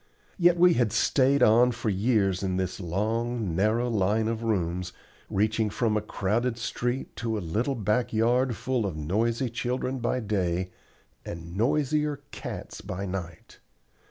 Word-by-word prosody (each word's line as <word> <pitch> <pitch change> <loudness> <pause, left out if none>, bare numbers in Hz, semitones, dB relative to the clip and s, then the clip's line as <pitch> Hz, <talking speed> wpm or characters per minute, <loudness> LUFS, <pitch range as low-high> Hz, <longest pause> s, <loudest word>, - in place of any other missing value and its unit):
Yet 175 0 +5
we 175 0 +6
had 120 -8 +1
stayed 135 +4 +3
on 120 +3 +6
for 115 -2 -2
years 100 -2 +1
in 95 -2 -1
this 95 0 -2
long, 110 +2 -1
narrow 110 +6 +2
line 110 0 +1
of 115 0 -2
rooms, 90 -5 -1 0.4
reaching 110 +2 +1
from 110 +1 0
a 105 - +1
crowded 110 +4 -1
street 120 +2 -3
to 115 -1 -2
a - - -1
little 110 - -1
back 110 +2 0
yard 120 +2 +2
full 125 -4 -1
of 85 -5 -5
noisy 115 - 0
children 125 +2 -2
by 120 +2 0
day, 95 -5 -1 0.5
and 85 0 -7
noisier 150 +5 +1
cats - - -7
by 100 0 -5
night. 90 -4 -7
110 Hz, 150 wpm, -27 LUFS, 95-120 Hz, 0.5 s, we